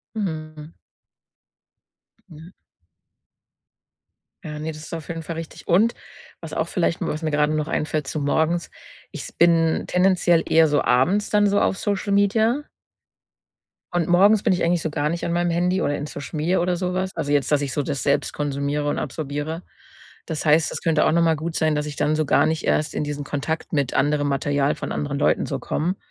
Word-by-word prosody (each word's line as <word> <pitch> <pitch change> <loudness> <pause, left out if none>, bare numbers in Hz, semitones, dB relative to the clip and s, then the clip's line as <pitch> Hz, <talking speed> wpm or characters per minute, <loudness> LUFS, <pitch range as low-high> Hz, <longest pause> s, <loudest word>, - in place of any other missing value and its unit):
Mhm. 155 -5 -5 1.6
Ja. 160 +2 -13 1.9
Ja. 150 -1 -6
Ne, 160 +1 -4
das 155 0 -10
ist 160 - -7
auf 160 0 -7
jeden 165 -1 -4
Fall 165 +1 -6
richtig. 165 -1 -8
Und 210 +7 +4 0.5
was - - -7
auch - - -1
vielleicht 170 -3 0
was 155 +2 -3
mir 155 - -1
gerade 150 +1 +2
noch 155 0 -1
einfällt 155 -2 -1
zu 155 - -3
morgens. 160 +4 0 0.4
Ich - - -7
s - - -9
bin 165 -1 +3
tendenziell 180 -2 +3
eher 160 0 +6
so 145 0 +2
abends 180 +12 +2
dann 210 -1 +4
so 200 0 +2
auf - - +1
Social 200 0 -2
Media. 220 +7 +2 1.3
Und 175 -1 0
morgens 200 +4 +5
bin - - +3
ich 180 - 0
eigentlich 170 -1 +1
so 160 - -2
gar 150 0 -1
nicht 170 +2 -3
an 170 - -1
meinem 175 0 +1
Handy 180 +2 +1
oder 145 - 0
in 145 - -5
Social 145 +1 -7
Media 170 +4 +1
oder 180 0 0
sowas 185 +1 -2
also 145 -3 -1
jetzt, 145 -2 +1
dass 150 -1 +3
ich 140 -2 -3
so 145 - 0
das 140 -1 -3
selbst 140 - +1
konsumiere 145 0 -2
und - - -1
absorbiere. 150 +3 -4 0.6
Das 160 -1 -4
heißt, 155 +2 +4
das - - -5
könnte 165 -3 +2
auch - - +3
noch 170 0 +3
mal 165 -1 +3
gut 160 +2 -4
sein, 155 -1 +2
dass 150 0 -1
ich 145 - -6
dann 150 - +1
so 155 0 +1
gar - - +4
nicht 160 0 -1
erst 150 - +1
in - - -1
diesen 145 -1 -4
Kontakt 155 +5 -3
mit 140 -4 0
anderem 145 +1 +1
Material 140 +1 0
von - - -5
anderen 140 -1 -3
Leuten - - +2
so 135 -3 -3
komme, 170 +8 -2
160 Hz, 200 wpm, -23 LUFS, 150-175 Hz, 1.9 s, eher